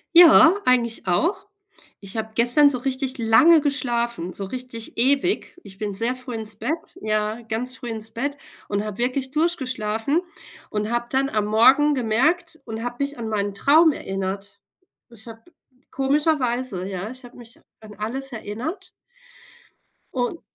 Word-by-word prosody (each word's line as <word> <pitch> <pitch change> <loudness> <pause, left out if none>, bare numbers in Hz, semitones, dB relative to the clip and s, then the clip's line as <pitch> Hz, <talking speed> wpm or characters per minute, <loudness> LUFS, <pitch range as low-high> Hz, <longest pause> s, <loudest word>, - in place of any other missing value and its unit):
Ja, 335 +1 +9
eigentlich 235 -5 +1
auch. 340 - 0 0.5
Ich 195 +2 -7
habe 220 0 -3
gestern 245 +5 +5
so 255 -3 -2
richtig 260 0 -2
lange 300 +8 +6
geschlafen, 240 - -2
so 200 - -6
richtig 235 +2 -7
ewig. 280 - +1
Ich 195 -1 -10
bin 205 0 -3
sehr 230 +4 -1
früh 255 -1 -7
ins 220 -2 -6
Bett, 320 +8 -4
ja, 215 +1 -1
ganz 235 +3 -4
früh 245 - -7
ins 220 -1 -5
Bett 280 +5 -3 0.3
und 200 0 -1
habe 210 -2 -6
wirklich 260 +2 -1
durchgeschlafen 265 -4 0 0.5
und 210 +1 -2
habe 240 0 0
dann 270 +1 +1
am 215 -5 0
Morgen 260 +8 +5
gemerkt 315 +8 0
und 225 +1 -6
habe 245 0 -4
mich 280 0 -2
an 225 -2 -5
meinen 205 -2 -1
Traum 310 +10 +5
erinnert. 195 +1 -5 0.5
Ich 235 -1 -13
habe 225 0 -10 0.5
komischerweise, 260 - 0
ja, 195 +2 -5
ich 255 +1 -11
habe 245 0 -14
mich 235 -1 -12 0.2
an 215 -1 -12
alles 255 +6 -4
erinnert 255 - -6 1.2
un 255 +6 -2
240 Hz, 150 wpm, -23 LUFS, 215-275 Hz, 1.2 s, Ja